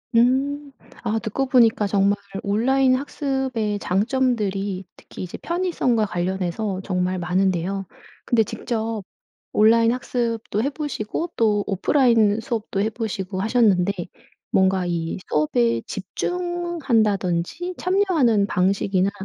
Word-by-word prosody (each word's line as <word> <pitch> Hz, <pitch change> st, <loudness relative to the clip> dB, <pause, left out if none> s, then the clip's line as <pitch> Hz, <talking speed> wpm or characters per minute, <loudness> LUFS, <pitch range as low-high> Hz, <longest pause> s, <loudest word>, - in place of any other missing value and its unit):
음. 275 Hz, +4 st, +2 dB, 0.3 s
아 225 Hz, -1 st, 0 dB
듣고 240 Hz, +4 st, -2 dB
보니까 230 Hz, -5 st, +4 dB
정말 200 Hz, 0 st, +3 dB, 0.3 s
온라인 255 Hz, +6 st, +3 dB
학습의 260 Hz, -6 st, -2 dB
장점들이 200 Hz, -3 st, 0 dB
특히 -, -, -10 dB
이제 180 Hz, -, -7 dB
편의성과 335 Hz, -11 st, 0 dB
관련해서 190 Hz, +2 st, -2 dB
정말 185 Hz, -1 st, -1 dB
많은데요. 185 Hz, +2 st, 0 dB, 0.4 s
근데 225 Hz, -2 st, +3 dB
직접 225 Hz, 0 st, -3 dB, 0.5 s
온라인 230 Hz, +2 st, +5 dB
학습도 235 Hz, -3 st, -2 dB
해 280 Hz, -, 0 dB
보시고 295 Hz, +2 st, -4 dB
또 210 Hz, -3 st, +2 dB
오프라인 225 Hz, 0 st, +3 dB
수업도 220 Hz, -3 st, -3 dB
해 215 Hz, -, +2 dB
보시고 200 Hz, -4 st, -4 dB
하셨는데 205 Hz, -5 st, +3 dB, 0.6 s
뭔가 190 Hz, -1 st, +2 dB
이 170 Hz, 0 st, -2 dB
수업에 120 Hz, -6 st, +1 dB
집중한다든지 300 Hz, -, -1 dB
참여하는 335 Hz, -, +2 dB
방식이나 190 Hz, 0 st, +1 dB
215 Hz, 270 characters per minute, -23 LUFS, 190-255 Hz, 0.6 s, 온라인